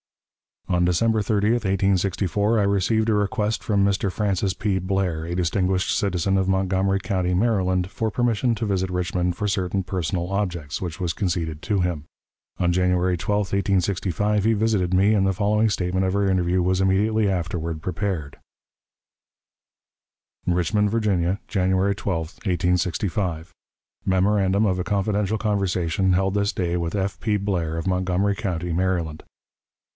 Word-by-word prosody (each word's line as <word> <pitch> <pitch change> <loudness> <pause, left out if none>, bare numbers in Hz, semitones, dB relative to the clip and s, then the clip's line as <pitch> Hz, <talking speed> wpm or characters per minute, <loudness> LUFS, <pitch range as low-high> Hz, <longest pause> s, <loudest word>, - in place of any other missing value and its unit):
On 90 -1 +1
December 110 +6 +2
30, 105 +1 +1
1864, 100 +2 +1
I - - +3
received 100 +3 +1
a - - +3
request 105 +1 0
from 100 -2 +2
Mr. 100 -1 +1
Francis 100 -1 0
P. 95 0 -1
Blair, 90 -4 -1
a 85 +1 -4
distinguished 90 +1 0
citizen 95 0 0
of 95 -1 +1
Montgomery 95 0 +1
County, 90 -3 -1
Maryland, 95 -3 +1
for 110 +1 -1
permission 120 +1 +1
to 110 - -3
visit 95 -2 0
Richmond 90 -1 -1
for 105 +3 -2
certain 95 -1 -1
personal 90 -1 -2
objects, 85 -7 -2
which 90 0 -5
was 85 -3 -1
conceded 80 -4 -2
to 100 -3 0
him. 85 -5 -2 0.5
On 90 -1 +1
January 90 0 +1
12, 105 +4 0
1865, 100 +1 0
he 115 - +4
visited 105 -4 +1
me, 100 +4 +4
and 95 -2 +2
the 95 - +1
following 105 +3 +2
statement 95 -1 0
of 95 +1 0
our 100 -1 +2
interview 90 -1 +1
was 95 +1 +1
immediately 105 +3 +2
afterward 85 -3 -3
prepared: 90 -5 -3 2.1
"RICHMOND, 90 +4 +1
VIRGINIA, 100 -4 0
January 95 0 +1
12, 100 -3 -2 0.3
1865. 90 -1 -1 0.6
"_Memorandum 95 +2 +2
of 95 -2 0
a - - 0
confidential 105 +1 0
conversation 95 -3 0
held 95 +1 +1
this 100 0 0
day 90 -2 -1
with 85 +2 -2
F. 95 -1 -2
P. 105 -3 0
BLAIR, 90 -5 -2
of 80 - -4
Montgomery 95 +2 +1
County, 90 -3 -3
Maryland. 85 -3 -1
95 Hz, 145 wpm, -23 LUFS, 90-100 Hz, 2.1 s, he